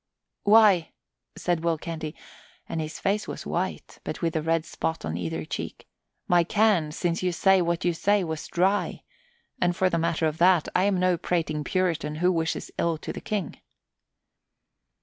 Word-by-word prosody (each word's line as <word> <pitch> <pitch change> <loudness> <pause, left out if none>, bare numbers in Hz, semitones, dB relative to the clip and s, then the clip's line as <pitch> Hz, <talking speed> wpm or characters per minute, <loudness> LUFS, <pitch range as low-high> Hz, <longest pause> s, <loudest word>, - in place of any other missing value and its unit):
"Why," 205 -5 +5 0.4
said 175 -2 -1
Will 165 -1 +1
Canty, 160 -1 -5 0.5
and 165 - -3
his 155 0 -5
face 205 +2 0
was - - -6
white, - - -3
but - - -5
with 165 -1 -1
a 160 - +1
red 165 0 0
spot 160 - -3
on 80 +1 -3
either 80 -2 -3
cheek, - - -6 0.4
"my 175 -1 +4
can, 195 -4 +2
since 170 +2 -1
you 180 -1 +1
say 190 +2 +4
what 170 0 -1
you 175 - +3
say, 200 +4 +2
was 160 -2 -4
dry; 190 +4 0 0.6
and 175 0 +2
for 185 0 +2
the 170 - +1
matter 165 0 0
of 155 0 -1
that, 175 -2 +5
I 185 - +4
am 200 -2 +2
no 180 -1 +2
prating 155 -4 -1
Puritan 165 -4 -1
who 180 +4 +2
wishes 165 -2 -2
ill 170 -1 +1
to - - -6
the - - -7
King." 205 -7 -3
170 Hz, 175 wpm, -26 LUFS, 160-185 Hz, 0.6 s, Why